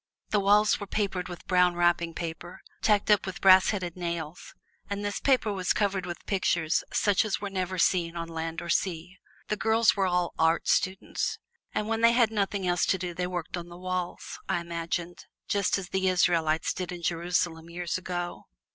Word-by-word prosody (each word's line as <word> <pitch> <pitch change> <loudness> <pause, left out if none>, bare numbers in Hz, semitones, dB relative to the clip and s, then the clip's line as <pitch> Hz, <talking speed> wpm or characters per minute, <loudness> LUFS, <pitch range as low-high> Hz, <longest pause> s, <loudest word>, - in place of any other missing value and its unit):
The 210 - +3
walls 205 +2 +4
were 205 - -6
papered 195 -3 -2
with 175 - -9
brown 180 -1 +3
wrapping 175 -1 +1
paper, 170 +1 -6 0.2
tacked 210 -1 +3
up 205 -2 +3
with 190 - -5
brass 190 -1 +7
headed 180 -5 -3
nails, 170 -2 -5 0.3
and 200 0 -3
this 205 -1 -2
paper 250 -6 +2
was 185 -2 0
covered 195 -3 0
with 175 - -7
pictures 175 -4 +1
such 205 -2 +2
as 215 -3 -2
were 200 -1 -5
never 185 -1 -2
seen 170 -1 +2
on 165 -1 -4
sea 165 0 -4
or 170 - -7
land. 170 -1 -1 0.4
The 210 - 0
girls 225 +1 +3
were 195 -2 +1
all 180 -1 0
art 160 +1 +2
students, 190 0 0 0.4
and 210 - -1
when 225 0 -1
they 230 0 +6
had 235 -3 +3
nothing 200 -2 -1
else 175 -1 +1
to 190 - +2
do 180 -1 -4
they 180 +1 -2
worked 175 -2 -4
on 175 -1 -6
the 175 - -10
walls, 185 -1 -4
I - - +1
imagined, 170 +1 -4 0.2
just 200 -1 +1
as 190 -2 -6
the 190 0 0
Israelites 170 -3 +2
did 180 -1 -5
in 175 -1 -7
Jerusalem 170 -1 -1
years 175 +1 -3
ago. 175 -1 -5
180 Hz, 190 wpm, -28 LUFS, 170-195 Hz, 0.4 s, brass